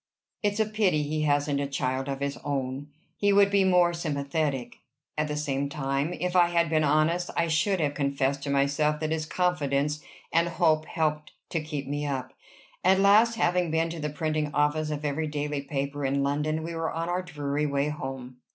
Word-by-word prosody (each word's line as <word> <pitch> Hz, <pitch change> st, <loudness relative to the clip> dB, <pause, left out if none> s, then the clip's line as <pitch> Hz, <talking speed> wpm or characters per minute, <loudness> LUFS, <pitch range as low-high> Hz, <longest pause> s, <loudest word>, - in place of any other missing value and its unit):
"It's 205 Hz, 0 st, 0 dB
a 220 Hz, -, +4 dB
pity 205 Hz, -8 st, +1 dB
he 155 Hz, +1 st, -2 dB
hasn't 145 Hz, -1 st, +1 dB
a 140 Hz, -, -1 dB
child 135 Hz, -1 st, -2 dB
of 135 Hz, 0 st, -4 dB
his 140 Hz, 0 st, -1 dB
own! 135 Hz, 0 st, -3 dB, 0.3 s
he 205 Hz, 0 st, +3 dB
would 200 Hz, 0 st, +5 dB
be 200 Hz, -1 st, +4 dB
more 180 Hz, -2 st, +4 dB
sympathetic." 140 Hz, -5 st, -2 dB, 0.4 s
At 150 Hz, 0 st, 0 dB
the 150 Hz, 0 st, -3 dB
same 140 Hz, -1 st, -1 dB
time, 140 Hz, +1 st, -1 dB
if 180 Hz, +1 st, -3 dB
I 175 Hz, -1 st, +6 dB
had 170 Hz, -1 st, +1 dB
been 155 Hz, -1 st, +3 dB
honest, 155 Hz, +4 st, +2 dB
I 170 Hz, -, +2 dB
should 180 Hz, +4 st, +1 dB
have 145 Hz, -3 st, 0 dB
confessed 140 Hz, -1 st, 0 dB
to 140 Hz, -, -4 dB
myself 140 Hz, +2 st, +1 dB
that 155 Hz, 0 st, -2 dB
his 160 Hz, -1 st, -1 dB
confidence 150 Hz, -5 st, 0 dB, 0.3 s
and 165 Hz, +1 st, +3 dB
hope 160 Hz, -2 st, +2 dB
helped 150 Hz, -2 st, -1 dB, 0.2 s
to 165 Hz, -, 0 dB
keep 150 Hz, -2 st, -5 dB
me 145 Hz, +1 st, -2 dB
up. 130 Hz, -2 st, -3 dB, 0.5 s
At 190 Hz, +1 st, +5 dB
last, 215 Hz, +4 st, +5 dB
having 180 Hz, -5 st, +1 dB
been 165 Hz, +1 st, 0 dB
to 170 Hz, -, -6 dB
the 150 Hz, 0 st, -2 dB
printing 155 Hz, 0 st, -1 dB
office 150 Hz, +1 st, +1 dB
of 150 Hz, 0 st, -4 dB
every 150 Hz, +2 st, -1 dB
daily 145 Hz, -1 st, -2 dB
paper 140 Hz, 0 st, -3 dB
in 140 Hz, +1 st, +1 dB
London, 150 Hz, +3 st, 0 dB
we 170 Hz, +1 st, -5 dB
were 165 Hz, 0 st, -2 dB
on 165 Hz, +1 st, -3 dB
our 180 Hz, +1 st, 0 dB
dreary 150 Hz, -4 st, -2 dB
way 140 Hz, +1 st, 0 dB
home. 130 Hz, -4 st, -6 dB
150 Hz, 195 wpm, -27 LUFS, 140-170 Hz, 0.5 s, I